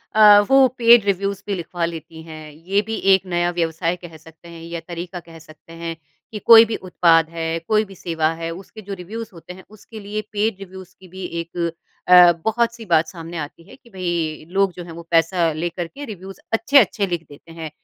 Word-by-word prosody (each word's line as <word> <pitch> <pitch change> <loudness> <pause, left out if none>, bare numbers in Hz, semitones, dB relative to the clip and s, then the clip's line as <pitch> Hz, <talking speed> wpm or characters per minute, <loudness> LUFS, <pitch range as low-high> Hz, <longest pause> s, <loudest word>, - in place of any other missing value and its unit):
अ, 210 -1 +8
वो 270 -1 +6
paid 235 -3 +6
reviews 200 0 -1
भी 200 - -1
लिखवा 175 0 -3
लेती 165 -1 -8
हैं। 155 -1 -10
ये 180 +7 -1
भी 220 +1 -3 0.2
एक 190 0 +2
नया 175 -1 0
व्यवसाय 165 0 -1
कह 175 -2 -12
सकते 160 +2 -17
हैं 170 -1 -11
या 170 0 -6
तरीका 175 +1 -6
कह 165 -1 -14
सकते 160 +1 -17
हैं 165 0 -4 0.4
कि 210 - -6
कोई 230 +1 +8
भी 225 - -3
उत्पाद 165 -3 +2
है, 165 0 -3
कोई 215 0 +2
भी 195 -1 -14
सेवा 160 -3 -1
है, 165 - -3
उसके 195 +5 -11
जो 200 0 -7
रिव्युज़ 215 +5 -7
होते 175 +1 -11
हैं, 185 - -14
उसके 215 +1 -13
लिए 210 +1 -4
पेड 210 -1 -1
रिव्युज़ 190 -1 -11
की 190 - -15
भी 190 +2 -10 0.2
एक 170 0 -4 0.4
अ, 180 -1 +8
बहुत-सी 235 +1 -1
बात 165 -4 +2
सामने 165 0 -8
आती 155 +2 -7
है - - -13
कि, 255 -3 -22
"भई, 175 -6 -3
लोग 195 0 +2
जो 175 - -8
हैं 170 - -11
वो 170 +1 -9
पैसा 165 0 +2
लेकर 170 +2 -4
के 285 +11 -9
रिव्युज़ 195 -2 -10
अच्छे-अच्छे 225 -4 +3
लिख 170 -2 -4
देते 145 +3 -15
हैं।" 165 -1 -7
175 Hz, 210 wpm, -21 LUFS, 165-200 Hz, 0.4 s, अ